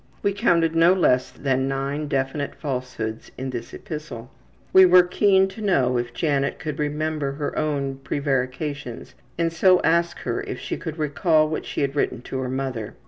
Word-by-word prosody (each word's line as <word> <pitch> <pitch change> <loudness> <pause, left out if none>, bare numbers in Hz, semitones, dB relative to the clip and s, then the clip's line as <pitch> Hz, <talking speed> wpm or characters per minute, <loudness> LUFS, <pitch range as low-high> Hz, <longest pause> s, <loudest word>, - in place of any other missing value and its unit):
We 200 -1 +2
counted 170 -6 +2
no 165 +2 +6
less 130 -9 +2
than 135 -1 -1
nine 140 +2 -2
definite 140 +1 -2
falsehoods 125 -6 -4
in 130 0 -4
this 120 -2 -6
epistle. 135 -6 -8 0.4
We 190 - +9
were 180 0 +7
keen 190 +1 +3
to 190 +3 -10
know 130 - +2
if 120 0 -4
Janet 140 -1 0
could 155 -2 -5
remember 150 -1 -1
her 145 +1 -4
own 140 -3 -1
prevarications 135 -1 -3 0.2
and 165 -1 0
so 185 +2 +5
asked 170 +1 +1
her - - -2
if - - -5
she - - -4
could 160 -2 -6
recall 155 +1 +2
what 155 - -4
she - - -3
had 140 0 -1
written 125 -4 -1
to 130 - -4
her 130 -1 -3
mother. 130 -5 -4
145 Hz, 175 wpm, -23 LUFS, 130-165 Hz, 0.4 s, We